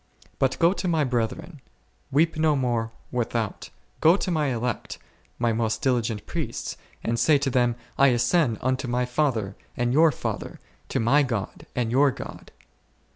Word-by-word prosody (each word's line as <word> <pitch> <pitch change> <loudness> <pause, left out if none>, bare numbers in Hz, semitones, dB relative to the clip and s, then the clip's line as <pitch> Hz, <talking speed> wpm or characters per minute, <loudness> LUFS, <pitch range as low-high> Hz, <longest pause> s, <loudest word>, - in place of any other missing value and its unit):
But 130 -1 +1
go 170 +2 +4
to 195 - -3
My 160 -3 +2
brethren; 125 +5 -2 0.5
weep 160 +4 +3
no 155 -1 +3
more 120 -4 0 0.2
without; 115 -3 -2 0.3
go 165 +4 +6
to 190 - -2
My 155 -3 +1
elect, 120 -1 -3 0.4
My 120 -1 +1
most 110 +4 -1
diligent 120 -5 0
priests, - - -4 0.3
and 115 0 0
say 150 +3 +5
to 140 -1 -1
them, 120 -1 +2 0.2
I 140 - +7
ascend 125 0 +2
unto 130 0 0
My 125 +1 0
Father 120 -7 0 0.2
and 120 0 +1
your 160 +2 +6
Father, - - -5 0.3
to - - 0
My 130 +6 +4
God 115 -8 -3
and 120 -2 0
your 140 +3 +5
God. - - -8
125 Hz, 160 wpm, -25 LUFS, 115-150 Hz, 0.5 s, I